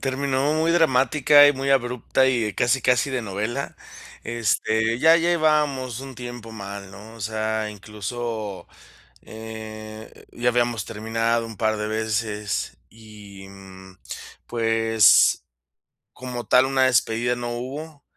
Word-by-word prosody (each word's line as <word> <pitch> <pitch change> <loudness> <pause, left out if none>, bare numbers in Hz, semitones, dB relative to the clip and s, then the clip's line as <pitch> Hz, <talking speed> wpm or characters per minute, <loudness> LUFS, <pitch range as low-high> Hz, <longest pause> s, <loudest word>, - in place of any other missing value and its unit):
Terminó 135 +2 0
muy 160 +1 +1
dramática 145 -2 +5
y 145 - +5
muy 135 +1 -3
abrupta 125 0 +1
y 115 -5 0
casi, 125 +1 +1
casi 125 +3 +2
de 130 -2 -2
novela. 110 +6 -4 0.5
Este, 110 0 0
ya 160 +4 +6
llevábamos 150 -7 +1
un 135 -1 -9
tiempo 120 -2 -8
mal, 100 -2 -8
¿no? 105 +3 -12
O 115 - -14
sea, 110 0 -2
incluso, 105 0 -6 0.6
eh, 110 0 -10
ya 120 +1 0
habíamos 120 -4 0
terminado 115 +1 -1
un 110 -2 -10
par 110 +1 0
de 105 0 -3
veces 110 -1 -3
y, 105 -3 -13
mm, 95 -1 -14 0.5
pues, 115 -2 +4 0.7
como 125 -2 -7
tal 125 +5 +5
una 135 -1 +1
despedida 120 -1 +1
no 120 0 -5
hubo, 140 +5 -7
115 Hz, 125 wpm, -23 LUFS, 110-130 Hz, 0.7 s, ya